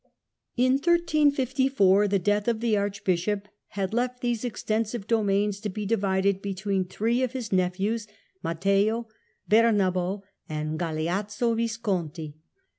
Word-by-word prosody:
In 255 +1 +4
1354 270 - +3
the 200 0 +2
death 205 +3 0
of 230 -2 +1
the 230 -2 +1
Archbishop 200 0 -1 0.5
left 245 +1 -1
these 240 -2 -1
ex 245 -3 -5
tensive 220 0 -1
dominions 205 -2 +1
to 210 0 -4
be 210 +2 -4
divided 195 -2 +1
between 195 -1 -1
three 225 +7 0
of 255 -1 -1
his 245 -5 -5
nephews, 195 +4 0 0.3
Matteo, 200 +7 +1 0.4
Bernabo 200 -4 +2 0.3
and 155 0 -3
Galeazzo 195 +8 -1
Visconti. 190 -10 -2
205 Hz, 115 wpm, -26 LUFS, 190-230 Hz, 0.5 s, In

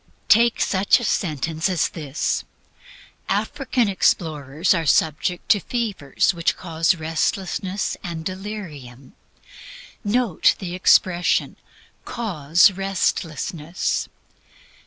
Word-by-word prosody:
Take 235 +2 +5
such 190 0 +3
a - - -6
sentence 160 - -1
as 180 -5 +1
this: 150 -3 -2 0.9
African 240 +3 0
explorers 160 -4 +1
are 165 -3 -1
subject 160 +5 +1
to 205 - +5
fevers 205 - -1
which 170 -2 0
cause 165 0 +1
restlessness 185 +4 -2
and 165 -2 -6
delirium. 170 - -7 0.9
Note 220 -4 +2
the 180 -3 -6
expression, 180 -1 +2 0.5
"cause 175 -4 +2
restlessness." 175 -3 -2
175 Hz, 90 wpm, -22 LUFS, 160-200 Hz, 0.9 s, Take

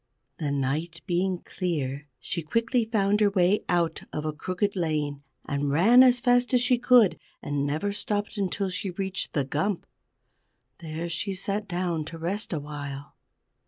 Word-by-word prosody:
The 150 -3 -1
night 145 +5 -2
being 180 0 0
clear, 150 -6 -3
she 170 - -3
quickly 230 - +1
found 210 -2 +2
her 205 - +5
way 195 +1 +2
out 170 -2 +1
of 150 - -4
a 155 - -1
crooked 185 +6 -2
lane, 150 -5 -1 0.3
and 140 0 -1
ran 200 - +6
as 250 -1 +6
fast 245 +1 +3
as 245 - +4
she 250 -1 +3
could, 235 -9 +5 0.2
and 145 0 -2
never 155 +8 -1
stopped 205 +1 -2
until 195 -1 -1
she 190 +1 -3
reached 190 +1 -3
the 140 -3 +1
Gump. 170 +8 -1 0.9
There 165 0 -5
she 190 +4 -2
sat 200 +2 -2
down 175 -3 -1
to 165 +1 -8
rest 185 +6 -2
awhile. 145 -3 -6
175 Hz, 160 wpm, -27 LUFS, 150-205 Hz, 0.9 s, ran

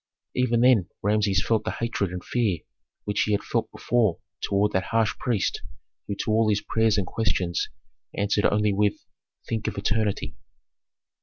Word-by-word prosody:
Even 120 -2 +2
then 120 -8 +5
Rameses 105 -1 +2
felt 110 -2 +2
the - - -2
hatred 115 -4 -1
and 90 0 -5
fear 105 -9 0 0.4
which 105 0 0
he 105 - +1
had 100 - 0
felt - - -1
before 115 -8 +1 0.2
toward 100 +1 +1
that 95 -2 0
harsh 115 -2 +1
priest 115 -6 0 0.5
who 100 - -2
to - - -1
all 110 0 +3
his 105 -1 +2
prayers 110 -2 +2
and 100 - +1
questions 90 -4 -1 0.5
answered 105 0 +1
only 105 0 +2
with, 105 0 +2 0.5
"Think 110 -2 -2
of - - -3
eternity." 105 0 -1
105 Hz, 160 wpm, -25 LUFS, 100-115 Hz, 0.5 s, then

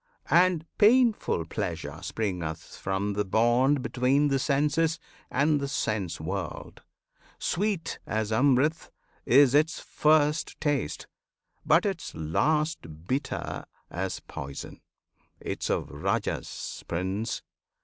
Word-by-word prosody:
And 175 -2 +4
painful 220 - +4
Pleasure 80 -5 -4
springeth 90 -7 -4
from 100 +2 -2
the 105 +1 0
bond 120 +7 +3
Between 135 +4 +2
the 135 -1 +2
senses 150 +4 +1 0.3
and 145 +3 +2
the 140 - -2
sense 105 -9 -2
world. 90 +2 -5 0.6
Sweet 200 -1 -1
As 110 0 -1
Amrit 140 +6 +2 0.4
is 135 0 +6
its 155 +3 +3
first 155 0 +2
taste, 145 - -1 0.6
but - - +4
its - - -3
last 85 - -1
Bitter 135 +3 -2 0.3
as 95 +2 -3
poison. 70 0 -8 0.6
'Tis - - -4
of - - 0
Rajas, 75 - -3
Prince! 95 +6 -2
130 Hz, 105 wpm, -28 LUFS, 95-150 Hz, 0.6 s, is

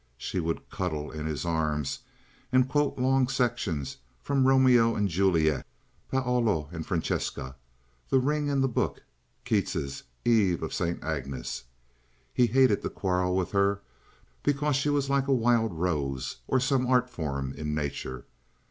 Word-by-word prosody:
She 90 - -3
would 80 -1 -2
cuddle 80 -5 -3
in 75 0 -4
his 80 +1 -3
arms 75 -4 -1 0.5
and 130 0 +4
quote 145 +2 +1
long 130 0 +3
sections 120 - -1 0.2
from 135 -2 +1
"Romeo 125 -4 +5
and 105 -1 +1
Juliet," 85 -5 +2 0.5
"Paolo 120 - +1
and 80 -2 -5
Francesca," 70 -6 -2 0.5
"The - - +4
Ring 145 +3 +1
and 140 -1 +2
the - - +3
Book," 125 - -1 0.4
Keats's 70 0 -1 0.2
"Eve 105 -7 +3
of - - -4
St. 85 0 -2
Agnes." 70 -7 -4 0.7
He 125 - +4
hated 130 -2 +4
to - - -2
quarrel 90 -1 0
with 95 -2 0
her, 100 0 +2 0.6
because 145 0 +1
she 140 +2 +1
was 145 -1 +1
like 140 0 +1
a - - +1
wild 115 -2 +2
rose 75 -6 -2
or 130 - +2
some 130 -1 +1
art 125 -1 +3
form 70 - -4
in 75 0 -3
nature. 70 -4 -4
100 Hz, 150 wpm, -28 LUFS, 80-130 Hz, 0.7 s, Romeo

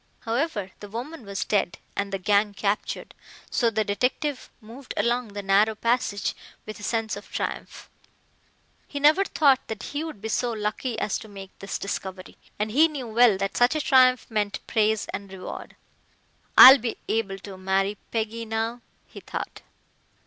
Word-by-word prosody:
However, 230 - -2
the 205 - -9
woman 245 +3 -7
was 200 0 -3
dead 200 -4 0 0.2
and 200 0 -2
the 195 - -1
gang 205 +2 +2
captured, 200 +1 -2 0.4
so 235 -3 +2
the 220 -1 0
detective 250 +7 -1
moved 240 +4 -10
along 235 +3 +1
the 205 0 -5
narrow 205 +3 +3
passage 230 -2 0 0.3
with 215 - -8
a - - -11
sense 225 +1 -1
of - - -11
triumph. - - -5 1.0
He 285 - -5
never 305 +7 +5
thought 280 -7 +3
that 220 -2 -6
he 290 +2 -2
would 320 -10 -7
be 220 - -5
so 240 +1 0
lucky 220 +3 -3
as 210 - -1
to 220 - -11
make 195 -2 -10
this 195 - -4
discovery, 190 -1 -6 0.2
and 210 +1 -2
he 305 +8 +5
knew 275 -7 -6
well 225 -2 +5
that 195 0 -3
such 245 +5 +3
a - - +1
triumph 255 -3 +4
meant 210 -2 -2
praise 220 -1 +1
and 200 -1 -6
reward. 190 -1 -8 0.8
"I'll 265 +2 +12
be 230 0 -3
able 205 -3 -1
to 195 0 -10
marry 195 +2 0
Peggy 225 0 -3
now," 225 +2 -2 0.2
he - - -12
thought. - - -6
220 Hz, 170 wpm, -25 LUFS, 200-245 Hz, 1.0 s, I'll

